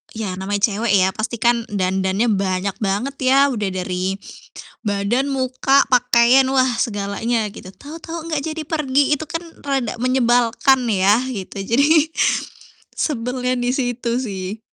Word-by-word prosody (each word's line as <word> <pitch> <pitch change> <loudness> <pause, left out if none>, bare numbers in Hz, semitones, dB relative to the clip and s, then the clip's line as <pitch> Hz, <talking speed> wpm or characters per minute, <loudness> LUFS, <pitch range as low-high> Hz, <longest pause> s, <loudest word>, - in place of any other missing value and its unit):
ya 205 -4 -4
namanya 200 +1 -2
cewek 215 +1 -1
ya 190 -1 +4
pastikan 235 +2 0
dandannya 190 +2 0
banyak 195 -1 -1
banget 210 +7 -2
ya, 265 +1 +3
udah 210 -5 -2
dari 185 +1 -2 0.7
badan, 205 +7 0
muka, 265 +1 +2
pakaian, 250 +1 +4
wah 260 -1 +3
segalanya 215 +1 -1
gitu. 185 - -11
Tahu-tahu 330 +2 -8
enggak 300 -3 -1
jadi 320 - -5
pergi, 290 -2 +1
itu 315 - -5
kan 330 +2 -4 0.2
rada 270 -5 -1
menyebalkan 250 +1 +2
ya, 200 +3 +3
gitu. 195 -2 -6
Jadi, 295 +7 +3 0.8
sebelnya 250 -2 -1
di 245 0 0
situ 245 -2 -2
sih. 195 -2 -5
235 Hz, 130 wpm, -20 LUFS, 200-265 Hz, 0.8 s, ya